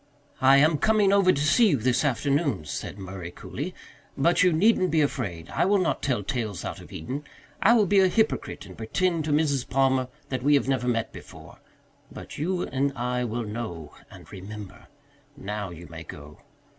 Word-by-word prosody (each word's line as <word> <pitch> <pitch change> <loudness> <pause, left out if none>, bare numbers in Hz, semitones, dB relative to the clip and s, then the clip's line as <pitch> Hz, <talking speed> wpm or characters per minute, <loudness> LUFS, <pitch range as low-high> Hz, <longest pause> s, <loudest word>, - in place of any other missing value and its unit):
"I 135 +1 +7
am 150 +1 +4
coming 210 -1 +3
over 195 -2 +5
to 140 - -1
see 225 +10 +5
you 145 - +2
this 125 +3 +1
afternoon," 140 - 0
said 75 - -5
Murray 95 -3 -7
coolly. - - -7 0.4
"But 170 +6 +3
you 180 - +5
needn't 185 +2 +3
be 160 0 +2
afraid. 100 - -2
I - - +1
will 200 +2 +3
not 180 -4 0
tell 125 -7 0
tales 115 - -3
out - - -5
of - - -14
Eden. 130 - -5 0.4
I 235 - +6
will 215 -3 +4
be 195 +1 +4
a 190 - +5
hypocrite 220 +4 -1
and - - -12
pretend 165 +8 -1
to 155 - -1
Mrs. 145 -4 +1
Palmer 130 -1 +2 0.2
that 130 -2 -2
we 145 +3 +4
have 140 - +1
never 130 -2 0
met 115 -2 -1
before. - - -12 0.5
But - - -9
you 180 +4 -1
and 140 +1 -1
I 125 +1 -1
will 120 +1 -3
know 105 -9 -6 0.2
and - - -13
remember. 105 +3 -9 0.5
Now, 105 -5 -4
you 85 0 -10
may 85 -1 -9
go. 75 -1 -11
135 Hz, 190 wpm, -26 LUFS, 105-160 Hz, 0.5 s, I